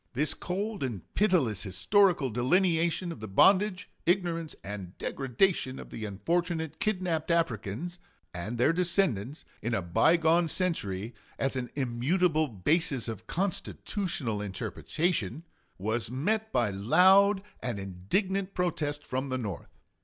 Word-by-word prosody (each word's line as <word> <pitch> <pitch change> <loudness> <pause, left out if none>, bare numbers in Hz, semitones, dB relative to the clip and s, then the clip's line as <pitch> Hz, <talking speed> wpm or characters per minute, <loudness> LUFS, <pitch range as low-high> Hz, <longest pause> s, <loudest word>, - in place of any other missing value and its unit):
This 150 +4 +1
cold 200 +3 -3
and 120 -9 -3
pitiless 165 - +2
historical 135 - +3
delineation 170 - +2
of 165 - -8
the 110 - -6
bondage, 190 - +4 0.2
ignorance, 170 -3 0
and 100 -2 -7
degradation 135 +1 0
of - - -10
the 110 - -5
unfortunate 160 - -2
kidnaped 185 -8 -1
Africans 165 - -1 0.3
and 95 +7 -4
their 130 +7 +4
descendants 165 - 0 0.2
in 115 +1 -1
a 95 - 0
by 125 - +4
gone 165 +1 +3
century, 120 - -1 0.2
as 135 0 -1
an 125 -2 -3
immutable 150 +6 +1
basis 130 - 0
of 110 -1 -6
constitutional 170 - -2
interpretation, 120 - -2 0.3
was 110 +2 -2
met 215 - -1
by 120 -4 +2
loud 190 - +5 0.2
and 120 -4 -3
indignant 185 - -2
protest 150 -5 -1
from 130 +2 -3
the 130 - -1
North. 100 - -5
150 Hz, 125 wpm, -29 LUFS, 110-180 Hz, 0.3 s, loud